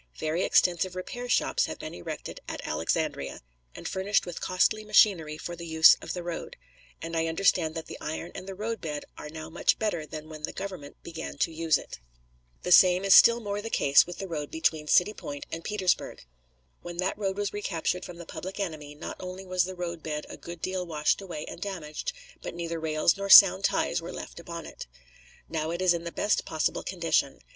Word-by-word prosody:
Very 155 +3 -1
extensive 180 +1 +2
repair 245 +7 -6
shops - - +2
have - - -6
been - - -7
erected - - -7
at - - -6
Alexandria, 155 - -2 0.3
and - - -6
furnished 195 +2 +1
with 175 -2 -7
costly 200 +4 +1
machinery 190 -8 +4
for 175 +2 -6
the 170 0 -8
use 160 0 +7
of - - -5
the 180 - -5
road, 170 -1 -6 0.5
and 165 0 -4
I 165 0 +1
understand 165 -1 +2
that 165 - -4
the - - -9
iron 160 +3 -5
and 185 - -8
the 195 - -6
roadbed 190 -8 -4
are 150 - -8
now 160 +1 -8
much 170 - +2
better 175 -8 -2
than 155 +1 -8
when 155 -1 -9
the 150 - -4
Government 185 -8 -7
began 165 -3 -7
to 165 - +1
use 160 -1 +2
it. - - -10 0.6
The 180 - -2
same 180 +1 +7
is 195 - +6
still 235 0 +8
more 205 -2 -3
the 225 - -5
case 140 -8 +5
with 175 - -7
the 195 - -5
road 150 -4 -4
between 160 -1 0
City 180 +7 +4
Point 145 -7 -7
and 165 0 -5
Petersburg. 190 - -1 0.6
When 175 0 -8
that 185 +1 0
road 195 -2 -2
was 205 -1 -2
recaptured 180 -3 -2
from 175 - -8
the 170 - -9
public 190 +4 -7
enemy 155 -6 -5
not 150 - -7
only 185 +1 -7
was 185 -1 +1
the 185 0 -6
roadbed 165 -4 -4
a - - -7
good 170 -1 -10
deal 185 -1 -1
washed 155 0 0
away 170 -6 -6
and - - -9
damaged, 180 - -4 0.3
but - - -6
neither 170 -1 -4
rails 160 +2 +2
nor 200 0 -4
sound 195 -1 +9
ties - - +1
were 165 - -7
left - - -8
upon 170 -1 -7
it. - - -9 0.6
Now 160 -1 -2
it 170 +1 -3
is 185 -1 +4
in 170 0 -4
the 170 - -4
best 205 - +1
possible 155 - -1
condition. 165 -6 0
170 Hz, 205 wpm, -28 LUFS, 160-190 Hz, 0.6 s, sound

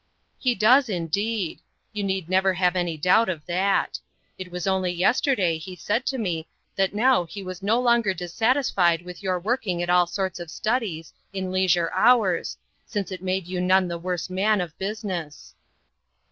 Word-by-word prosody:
"He 250 -2 +1
does, 245 +4 +5
indeed. 195 +2 -2 0.3
You 210 -1 -3
need 190 -3 -2
never 190 +1 +2
have 180 0 +2
any 175 -3 -1
doubt 185 +7 +3
of 160 -5 -4
that. 190 +3 0 0.4
It 185 -1 -6
was 180 -1 -5
only 190 -2 +1
yesterday 185 - +1
he 185 +3 -8
said 210 +8 -2
to 270 - -1
me 170 -8 -2 0.3
that 195 +1 0
now 245 -4 +3
he 180 +4 -8
was 185 0 -7
no 215 +5 +2
longer 235 -4 +3
dissatisfied 180 - +1
with 180 +2 -10
your 185 -2 0
working 190 -3 -1
at 175 - -1
all 180 -1 +4
sorts 190 +1 -3
of 170 -2 -7
studies, 210 -6 -2 0.2
in 190 -1 -3
leisure 180 -3 +2
hours, 220 -8 +3 0.3
since 205 -3 -3
it 185 -2 -6
made 185 -1 -1
you 180 0 -3
none 185 0 +3
the 170 -1 -4
worse 180 -1 -3
man 195 +3 +1
of 170 -3 -4
business." 190 -7 -5
185 Hz, 175 wpm, -24 LUFS, 175-210 Hz, 0.4 s, does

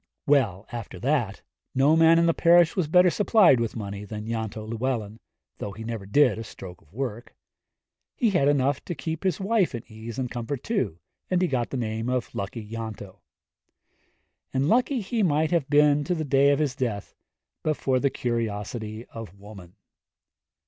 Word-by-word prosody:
Well, 115 - +2
after 115 -6 -6
that, 120 -6 0 0.3
no 140 +4 +4
man 165 0 +6
in 170 - +4
the 165 - +3
parish 170 -1 +5
was 180 -5 0
better 180 +3 +5
supplied 205 - +5
with 115 -1 -2
money 100 -2 -5
than 105 +1 -7
Ianto 110 -1 -4
Llewellyn, 115 -2 -3 0.4
though 100 - -5
he 110 +3 -8
never 110 -4 -5
did 125 -1 +3
a - - -4
stroke 90 -5 -11
of 75 - -27
work. 120 -1 -5 0.8
He 230 -4 +2
had 160 -7 +2
enough 140 -1 +2
to 175 - -4
keep 160 +3 -5
his 185 -5 0
wife 195 - +1
in 115 - -6
ease 110 0 -9
and 125 -2 -3
comfort, 120 +3 -4
too, 200 - -1 0.3
and 185 - +2
he 180 - +2
got 125 -5 -1
the 135 - -3
name 110 0 -2
of 125 -1 -2
Lucky 105 +2 -5
Ianto. 110 -3 -7 1.3
And 135 +2 0
lucky 250 - +2
he 220 +3 -2
might 155 -4 +2
have 165 -5 +1
been 145 0 +4
to 180 - 0
the 160 -2 -3
day 140 0 +4
of 140 - +3
his 145 -4 -1
death 115 -7 -3 0.5
but 155 -1 0
for 130 -1 +1
the 140 - +2
curiosity 110 -2 -3
of 110 -4 -9
woman. 100 -3 -13
125 Hz, 180 wpm, -26 LUFS, 110-155 Hz, 1.3 s, man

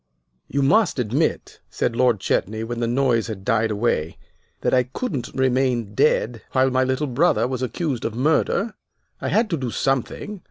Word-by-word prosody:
"You 140 0 0
must 205 +6 +3
admit," 125 +6 -1
said 115 - -1
Lord 125 -3 +3
Chetney, 110 +3 -1
when 120 +1 -4
the 120 - 0
noise 120 -2 +1
had 100 -4 -7
died 115 0 +2
away, 100 -7 -1 0.4
"that - - 0
I 130 - +5
couldn't 135 - -4
remain 130 -4 +1
dead 115 -2 +1
while 130 0 +3
my 130 0 +2
little 130 +3 0
brother 125 -4 +2
was 130 -1 -3
accused 130 0 -2
of 115 - -3
murder. 160 - +1 0.5
I - - -3
had 225 +1 +2
to 165 - +1
do 130 -3 -3
something. 135 - -2
125 Hz, 170 wpm, -22 LUFS, 115-140 Hz, 0.5 s, I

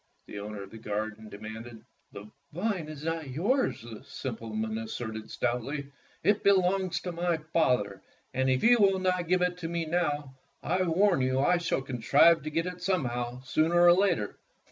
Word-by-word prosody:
the 100 - -8
owner 105 0 -6
of 100 - -12
the 115 - -10
garden 110 0 -4
demanded. 110 +2 -9 0.3
"The 100 +1 -9 0.2
vine 180 -2 -2
is 155 -1 -8
not 165 -3 -3
yours," 195 - 0
the 115 0 -10
simpleton 110 -5 -4
as 115 - -6
serted 110 -2 -5
stoutly. 140 +4 -2 0.3
"It 205 0 +3
belongs 190 -1 +3
to 180 - -4
my 170 0 0
father, 125 - 0 0.3
and 130 0 +1
if 130 0 +1
you 240 +1 +6
will 195 -2 +4
not 185 -2 0
give 180 +1 +2
it 180 0 -1
to 165 - -4
me 170 -1 -2
now, 150 -4 -1 0.3
I 180 +3 0
warn 180 -1 +3
you 130 0 +1
that 135 +2 +2
I 180 - +4
shall 165 -5 -1
contrive 140 +7 +4
to 155 - -4
get 165 +2 -1
it 180 0 -6
somehow, 125 -9 -1
sooner 155 +6 +2
or 175 0 +8
later." 175 - +1
150 Hz, 185 wpm, -29 LUFS, 115-180 Hz, 0.3 s, or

